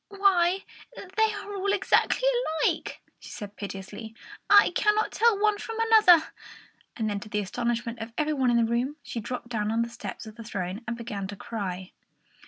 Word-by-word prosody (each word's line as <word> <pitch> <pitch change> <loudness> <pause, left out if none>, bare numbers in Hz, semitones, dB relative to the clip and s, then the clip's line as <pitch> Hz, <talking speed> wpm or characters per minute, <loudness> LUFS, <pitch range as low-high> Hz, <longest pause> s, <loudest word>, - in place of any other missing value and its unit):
"Why, 390 -2 +2 0.3
they 430 +3 0
are 410 0 -7
all 400 0 -1
exactly 410 +4 +2 0.4
alike!" - - -2 0.2
she - - -12
said 205 -2 -8
piteously. 200 +3 -7 0.3
"I 410 0 +7
cannot 425 +1 +2
tell 460 -3 +3
one 420 0 +2
from 455 0 -6
another." 430 -8 +6 0.7
And 210 -3 -2
to 215 - -10
the 210 - -2
astonishment 235 +3 -2
of 225 +1 -6
every 305 0 +1
one 265 -3 +2
in 240 - +3
the 230 - +3
room, 240 +5 -1
she 235 - -5
dropped 240 +2 -6
down 215 -3 -1
on 230 +1 +1
the 235 - -5
steps 235 0 -7
of 220 0 -11
the 230 - -8
throne 195 -2 -4
and 235 0 -3
began 210 -5 -5
to 205 - -7
cry. 190 -3 -5
235 Hz, 185 wpm, -27 LUFS, -, 0.7 s, I